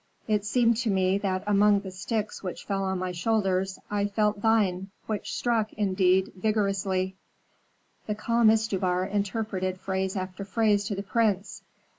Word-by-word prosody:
It 210 Hz, -2 st, +1 dB
seemed 235 Hz, +1 st, +3 dB
to 235 Hz, -1 st, -1 dB
me 190 Hz, 0 st, +2 dB
that 185 Hz, -2 st, -1 dB
among 205 Hz, 0 st, +4 dB
the 190 Hz, -2 st, -7 dB
sticks 210 Hz, +3 st, -3 dB
which 185 Hz, -2 st, -6 dB
fell 195 Hz, -1 st, -1 dB
on 190 Hz, 0 st, -1 dB
my 185 Hz, 0 st, -2 dB
shoulders 190 Hz, 0 st, 0 dB
I 205 Hz, 0 st, +1 dB
felt 210 Hz, 0 st, 0 dB
thine, 200 Hz, -4 st, +2 dB, 0.2 s
which 215 Hz, -2 st, -3 dB
struck, 225 Hz, -3 st, 0 dB
indeed, 190 Hz, -2 st, +2 dB
vigorously." 195 Hz, -2 st, 0 dB, 0.9 s
The 210 Hz, -, -1 dB
calm 230 Hz, +1 st, +3 dB
Istubar 190 Hz, -5 st, +1 dB
interpreted 195 Hz, -2 st, -2 dB
phrase 190 Hz, 0 st, -2 dB
after 185 Hz, +1 st, -4 dB
phrase 205 Hz, +1 st, +1 dB
to 200 Hz, -, -2 dB
the 200 Hz, -, -4 dB
prince. 210 Hz, -2 st, 0 dB
200 Hz, 150 wpm, -27 LUFS, 190-215 Hz, 0.9 s, among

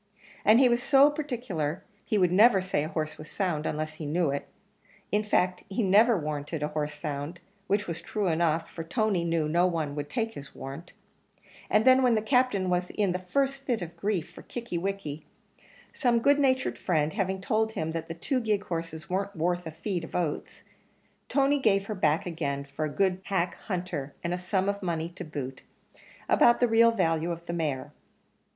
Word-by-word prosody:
and 215 Hz, +3 st, +6 dB
he 265 Hz, -, +6 dB
was 240 Hz, 0 st, +2 dB
so 275 Hz, +2 st, +6 dB
particular 225 Hz, -, -3 dB, 0.2 s
he 215 Hz, -, 0 dB
would 180 Hz, -3 st, +3 dB
never 205 Hz, +2 st, +6 dB
say 185 Hz, -5 st, -1 dB
a -, -, -3 dB
horse 155 Hz, -1 st, -3 dB
was 155 Hz, 0 st, -9 dB
sound, 175 Hz, -6 st, -1 dB
unless 155 Hz, 0 st, -3 dB
he 155 Hz, 0 st, -7 dB
knew 160 Hz, 0 st, +1 dB
it; 140 Hz, -, -3 dB, 0.6 s
in 210 Hz, -, +3 dB
fact, 185 Hz, -3 st, +1 dB
he 205 Hz, +4 st, -1 dB
never 210 Hz, +4 st, +5 dB
warranted 150 Hz, -1 st, -3 dB
a 150 Hz, -, -1 dB
horse 150 Hz, -1 st, -3 dB
sound; 145 Hz, +3 st, -5 dB, 0.3 s
which 205 Hz, +1 st, +1 dB
was 170 Hz, -1 st, -5 dB
true 210 Hz, -2 st, -2 dB
enough, 165 Hz, -1 st, +1 dB
for 165 Hz, -, -7 dB
Tony 200 Hz, 0 st, 0 dB
knew 165 Hz, -2 st, 0 dB
no 175 Hz, +4 st, +3 dB
one 160 Hz, -5 st, -2 dB
would 145 Hz, 0 st, -4 dB
take 225 Hz, +8 st, -2 dB
his 140 Hz, -6 st, -10 dB
warrant; 140 Hz, +6 st, -8 dB, 0.8 s
and 215 Hz, +1 st, +3 dB
then 260 Hz, 0 st, +7 dB
when 250 Hz, -3 st, +4 dB
the 215 Hz, -, +1 dB
Captain 250 Hz, -6 st, +2 dB
was 180 Hz, 0 st, 0 dB
in 205 Hz, -3 st, +2 dB
the 180 Hz, -, -2 dB
first 275 Hz, +9 st, -1 dB
fit 240 Hz, -8 st, -1 dB
of 170 Hz, 0 st, -8 dB
grief 185 Hz, -2 st, -2 dB
for -, -, -12 dB
Kickie 235 Hz, -8 st, -5 dB
wickie, 170 Hz, -6 st, -4 dB, 0.7 s
some 245 Hz, -4 st, +2 dB
good 285 Hz, +5 st, +4 dB
natured 260 Hz, -2 st, +1 dB
friend 155 Hz, -4 st, +1 dB
having 190 Hz, 0 st, -1 dB
told 220 Hz, +3 st, 0 dB
him 160 Hz, -7 st, -2 dB
that 165 Hz, 0 st, -4 dB
the 165 Hz, -, -6 dB
two 255 Hz, -, -1 dB
gig 210 Hz, -3 st, 0 dB
horses 165 Hz, -2 st, -5 dB
weren't 195 Hz, +2 st, -2 dB
worth 175 Hz, +1 st, -1 dB
a -, -, -5 dB
feed 175 Hz, +2 st, -3 dB
of 165 Hz, -, -8 dB
oats, 170 Hz, -4 st, -3 dB, 0.7 s
Tony 280 Hz, +1 st, +3 dB
gave 195 Hz, -6 st, +2 dB
her 215 Hz, -, -3 dB
back 160 Hz, -5 st, +1 dB
again 145 Hz, -5 st, -2 dB
for 140 Hz, +2 st, -4 dB
a -, -, -2 dB
good 185 Hz, +5 st, +1 dB
hack 185 Hz, -3 st, 0 dB
hunter, 175 Hz, -8 st, -3 dB
and 170 Hz, +1 st, -1 dB
a -, -, -1 dB
sum 190 Hz, +1 st, 0 dB
of 200 Hz, 0 st, -1 dB
money 165 Hz, -3 st, -2 dB
to 175 Hz, +1 st, -8 dB
boot, 135 Hz, -5 st, -6 dB, 0.7 s
about 240 Hz, -, +5 dB
the 245 Hz, -, +4 dB
real 230 Hz, 0 st, +6 dB
value 165 Hz, -6 st, +1 dB
of 170 Hz, 0 st, -5 dB
the 170 Hz, -, -4 dB
mare. 150 Hz, -6 st, -2 dB
180 Hz, 200 wpm, -28 LUFS, 160-215 Hz, 0.8 s, then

